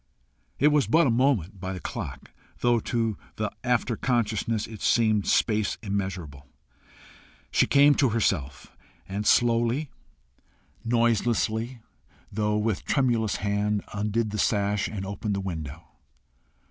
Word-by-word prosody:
It 150 - +4
was 150 -2 +2
but 165 +1 +4
a 125 - +3
moment 115 - +1
by 95 +1 -4
the 90 - -6
clock, - - -6 0.3
though 120 -1 +3
to 115 -2 -2 0.2
the 105 -2 -2
after 125 -1 +1
consciousness 115 -2 0
it 110 -2 -10
seemed 110 -3 +2
space 105 -2 +1
immeasurable. 90 -9 -4 1.0
She - - +3
came 145 +1 +6
to 135 -2 +2
herself, 75 - -1 0.3
and 100 +2 -3
slowly, 120 +4 +2 0.9
noiselessly, 115 0 0 0.5
though 105 +1 0
with 105 -2 -1
tremulous 120 -6 +1
hand, 105 0 0
undid 105 +2 -1
the 105 - -3
sash, 100 -1 +1
and 100 -3 -5
opened 100 +1 -3
the - - -2
window. 80 -5 -5
110 Hz, 125 wpm, -26 LUFS, 100-120 Hz, 1.0 s, came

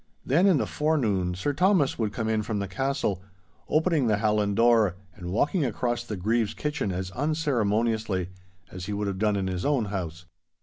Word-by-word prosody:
Then 170 +9 +4
in 185 -5 +5
the - - 0
forenoon 110 - 0
Sir 145 +11 -1
Thomas 180 -4 +2
would 110 -3 0
come 110 +1 -3
in 110 -1 +1
from 105 0 -3
the 100 -1 -2
castle, 105 -2 -1 0.5
opening 155 -4 +2
the 105 -2 +2
hallan 105 -1 +1
door 115 -5 +4 0.2
and 90 -1 -7
walking 145 - +1
across 120 0 -1
the 110 -4 -5
Grieve's 110 +3 0
kitchen 150 -8 -2
as 95 +1 -4
unceremoniously 110 - 0 0.4
as 95 0 -7
he 105 - -3
would 105 +1 -2
have 100 -1 -3
done 105 -1 +2
in 95 -1 -1
his 90 -1 -3
own 140 -6 +1
house. 90 -2 -4
110 Hz, 185 wpm, -26 LUFS, 100-135 Hz, 0.5 s, in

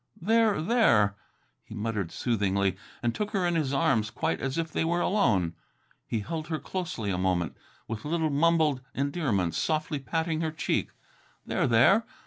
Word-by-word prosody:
"There, 220 +1 +3
there!" 160 - +4 0.5
he - - -11
muttered 105 -5 -2
soothingly, 100 -5 0 0.3
and 120 -1 +1
took 210 -1 -2
her 190 -3 +1
in 175 - +1
his 155 -5 0
arms 115 -6 +2
quite 160 +7 -2
as 135 +2 -2
if 165 -1 -2
they - - 0
were 170 +2 +1
alone. 105 - +2 0.5
He 115 - -1
held 155 +8 -4
her 160 -1 -2
closely 165 - -4
a 90 - -1
moment, 90 -3 0 0.3
with 110 -1 -5
little 160 0 0
mumbled 155 -2 +3
endearments, 135 - 0
softly 155 -2 -1
patting 160 +3 -1
her 160 - 0
cheek. 155 -1 -1 0.6
"There, - - 0
there! 130 - +5
145 Hz, 160 wpm, -28 LUFS, 105-165 Hz, 0.6 s, there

